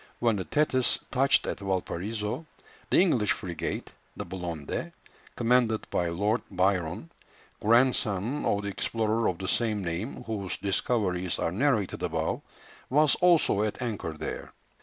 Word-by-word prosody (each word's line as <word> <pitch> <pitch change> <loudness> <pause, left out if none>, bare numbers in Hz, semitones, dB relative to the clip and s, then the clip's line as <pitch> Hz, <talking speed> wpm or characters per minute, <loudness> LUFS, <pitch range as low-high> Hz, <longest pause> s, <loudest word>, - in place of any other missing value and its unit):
When 115 -3 +2
the 95 - -3
Thetis 130 -4 +2
touched 135 +1 +4
at - - -3
Valparaiso, 100 - -3 0.4
the - - +4
English 130 - +3
frigate, 85 -4 -4 0.2
the - - -4
Blonde, 85 -5 -4 0.4
commanded 120 -2 +2
by 90 - +1
Lord 105 +7 +1
Byron, 90 -3 0 0.5
grandson 115 +1 +2
of 100 0 +1
the 100 - -2
explorer 110 +3 0
of 90 - 0
the 95 - -5
same 105 -2 +1
name, 90 +10 -3
whose 105 -5 -3
discoveries 95 -3 0
are 80 - -1
narrated 110 -1 +1
above, - - -1 0.5
was 150 +2 +5
also 170 - +4
at 105 -1 -1
anchor 110 -9 -3
there. 75 - -6
105 Hz, 135 wpm, -28 LUFS, 90-120 Hz, 0.5 s, was